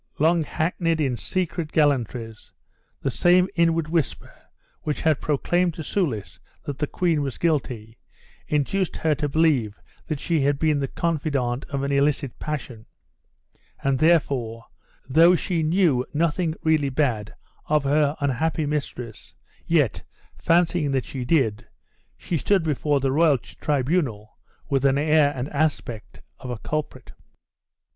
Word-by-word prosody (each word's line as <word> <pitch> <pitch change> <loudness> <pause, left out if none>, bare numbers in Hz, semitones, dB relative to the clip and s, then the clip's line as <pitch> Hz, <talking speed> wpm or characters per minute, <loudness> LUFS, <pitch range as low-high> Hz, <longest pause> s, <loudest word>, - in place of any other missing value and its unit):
Long 165 +2 +3
backneyed 165 +2 -1
in 135 -5 +1
secret 170 - -3
gallantries, 120 -6 -1 0.5
the 135 - 0
same 175 +10 +4
inward 165 -3 +2
whisper 160 -4 -2 0.5
which 150 - -3
had 155 -4 +2
proclaimed 170 +4 +1
to 160 - -6
Soulis 140 - -2 0.2
that 140 -1 -6
the 150 - 0
queen 165 -3 0
was 135 -3 -4
guilty, 125 -9 -2 0.5
induced 160 +6 0
her 160 -1 +1
to 150 0 -2
believe 135 -9 +1 0.3
that 155 -3 -3
she 165 -1 0
had 140 +1 +2
been 155 -1 +1
the 135 - -1
confidante 140 -6 -2
of 140 -2 -2
an 140 - -1
illicit 140 -1 0
passion; 130 -7 -5 1.0
and 135 -1 +1
therefore, 135 -8 +1 0.4
though 165 +6 +6
she 175 -1 -1
knew 155 -5 +2
nothing 165 +1 0
really 155 -3 +2
bad 125 -7 -1 0.3
of 150 -1 +2
her 145 +1 +2
unhappy 145 +3 0
mistress, 135 -6 -5 0.3
yet, 150 - +2 0.3
fancying 170 -2 +2
that 135 -2 0
she 130 -2 -5
did, 120 -7 +1 0.5
she 170 - -2
stood 195 +3 +2
before 150 -2 0
the 135 0 0
royal 150 0 +4
tribunal 130 - -2 0.3
with 135 -3 +1
the 140 0 +3
air 150 -1 +4
and 130 +1 -3
aspect 140 -7 -3 0.2
of 125 - -8
a 120 - -3
culprit. 155 +6 -5
150 Hz, 135 wpm, -24 LUFS, 130-160 Hz, 1.0 s, though